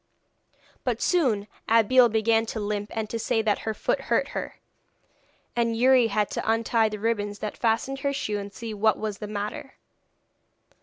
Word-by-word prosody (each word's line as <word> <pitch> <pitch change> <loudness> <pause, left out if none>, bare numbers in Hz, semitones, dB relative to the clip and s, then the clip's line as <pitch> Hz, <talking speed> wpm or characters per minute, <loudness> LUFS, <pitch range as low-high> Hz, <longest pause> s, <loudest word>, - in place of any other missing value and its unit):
But - - -1
soon 245 - +1 0.2
Abeille 230 +2 +5
began 225 +1 +2
to 220 - -4
limp 205 0 -3
and 220 -1 -1
to 230 - -2
say 225 0 0
that 210 -2 +1
her 220 - -3
foot - - -1
hurt - - 0
her, - - -5 1.0
and 230 -1 +1
Youri 255 0 +5
had 210 -1 0
to - - -1
untie 225 0 +2
the 215 - -5
ribbons 205 -1 -1
that 210 0 -5
fastened 240 +4 0
her 280 +1 0
shoe 210 -6 -2
and 200 0 -7
see 220 +3 -6
what 215 +1 +2
was 210 -2 -4
the 210 - -5
matter. 210 +5 -5
220 Hz, 170 wpm, -26 LUFS, 210-230 Hz, 1.0 s, Abeille